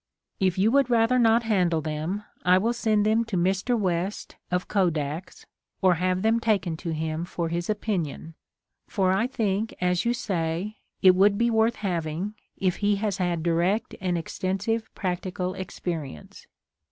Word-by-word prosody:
If 185 Hz, -2 st, +1 dB
you 205 Hz, +4 st, +3 dB
would 275 Hz, -1 st, +3 dB
rather 235 Hz, +1 st, +3 dB
not 230 Hz, 0 st, +4 dB
handle 180 Hz, -7 st, +2 dB
them 155 Hz, +6 st, -3 dB, 0.2 s
I 180 Hz, 0 st, +5 dB
will 225 Hz, +5 st, +1 dB
send 215 Hz, -3 st, +1 dB
them 220 Hz, +2 st, +3 dB
to 220 Hz, -5 st, -2 dB
Mr. 190 Hz, +7 st, +1 dB
West 185 Hz, -1 st, -2 dB
of 180 Hz, 0 st, -1 dB
Kodak's, 165 Hz, -3 st, -1 dB, 0.3 s
or 185 Hz, -1 st, +4 dB
have 185 Hz, +1 st, +1 dB
them 225 Hz, +1 st, +3 dB
taken 200 Hz, -8 st, +1 dB
to 170 Hz, -, -5 dB
him 160 Hz, +1 st, -2 dB
for 170 Hz, -1 st, -3 dB
his 170 Hz, +2 st, -3 dB
opinion, 180 Hz, -7 st, -2 dB, 0.5 s
for 190 Hz, -3 st, +1 dB
I 215 Hz, +5 st, +1 dB
think, 220 Hz, -4 st, -1 dB
as 180 Hz, 0 st, +1 dB
you 235 Hz, +1 st, +1 dB
say, 185 Hz, -1 st, -2 dB, 0.2 s
it 185 Hz, -1 st, +8 dB
would 200 Hz, +2 st, +4 dB
be 235 Hz, +1 st, +2 dB
worth 225 Hz, +1 st, +3 dB
having, 175 Hz, 0 st, -3 dB, 0.2 s
if 185 Hz, -2 st, 0 dB
he 205 Hz, 0 st, +2 dB
has 200 Hz, -1 st, -1 dB
had 175 Hz, -3 st, -1 dB
direct 175 Hz, +6 st, +1 dB
and 180 Hz, -2 st, 0 dB
extensive 195 Hz, +7 st, -2 dB
practical 185 Hz, -1 st, -3 dB
experience. 165 Hz, -, -6 dB
190 Hz, 160 wpm, -26 LUFS, 175-215 Hz, 0.5 s, it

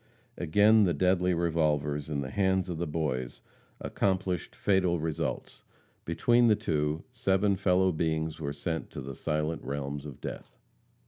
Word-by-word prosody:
Again 105 Hz, +6 st, +4 dB
the 85 Hz, -4 st, +1 dB
deadly 90 Hz, +2 st, +2 dB
revolvers, 75 Hz, -3 st, 0 dB
in 70 Hz, -2 st, -2 dB
the 65 Hz, -1 st, -5 dB
hands 95 Hz, -2 st, +1 dB
of 85 Hz, -2 st, -4 dB
the 85 Hz, -, -1 dB
boys, 70 Hz, -6 st, -3 dB, 0.4 s
accomplished 95 Hz, -3 st, -1 dB
fatal 90 Hz, -4 st, +2 dB
results. 80 Hz, 0 st, -3 dB, 0.4 s
Between 120 Hz, +8 st, +3 dB
the 110 Hz, -, +5 dB
two, 80 Hz, -6 st, -1 dB
seven 100 Hz, -4 st, +1 dB
fellow 95 Hz, 0 st, +2 dB
beings 80 Hz, -1 st, -1 dB
were 70 Hz, -2 st, -3 dB
sent 80 Hz, +3 st, -4 dB
to -, -, -5 dB
the 70 Hz, +1 st, -6 dB
silent 75 Hz, +4 st, -2 dB
realms 70 Hz, +1 st, -4 dB
of 70 Hz, -, -10 dB
death. -, -, -8 dB
80 Hz, 145 wpm, -29 LUFS, 75-95 Hz, 0.4 s, the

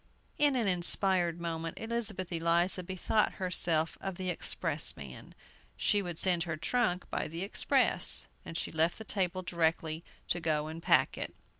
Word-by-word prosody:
In 290 Hz, -2 st, +5 dB
an 235 Hz, -4 st, +1 dB
inspired 180 Hz, -1 st, +4 dB
moment, 165 Hz, -1 st, -4 dB
Elizabeth 220 Hz, -5 st, -2 dB
Eliza 170 Hz, +3 st, +1 dB
bethought 185 Hz, +4 st, 0 dB
herself 170 Hz, -3 st, -1 dB
of 195 Hz, -2 st, -4 dB
the 185 Hz, 0 st, -2 dB
expressman. 70 Hz, -, -2 dB, 0.4 s
She 205 Hz, -, +2 dB
would 175 Hz, -4 st, -6 dB
send 180 Hz, -2 st, +3 dB
her 160 Hz, -2 st, -4 dB
trunk 180 Hz, +1 st, 0 dB
by -, -, -2 dB
the 165 Hz, +3 st, -5 dB
express, 200 Hz, -, +2 dB, 0.2 s
and 165 Hz, -, -6 dB
she -, -, -4 dB
left 160 Hz, +2 st, +1 dB
the 220 Hz, -, -8 dB
table 185 Hz, -3 st, -1 dB
directly 165 Hz, -2 st, -1 dB, 0.3 s
to 175 Hz, -, +1 dB
go 155 Hz, -2 st, 0 dB
and 160 Hz, +2 st, -7 dB
pack -, -, +2 dB
it. -, -, -5 dB
175 Hz, 155 wpm, -31 LUFS, 165-190 Hz, 0.4 s, In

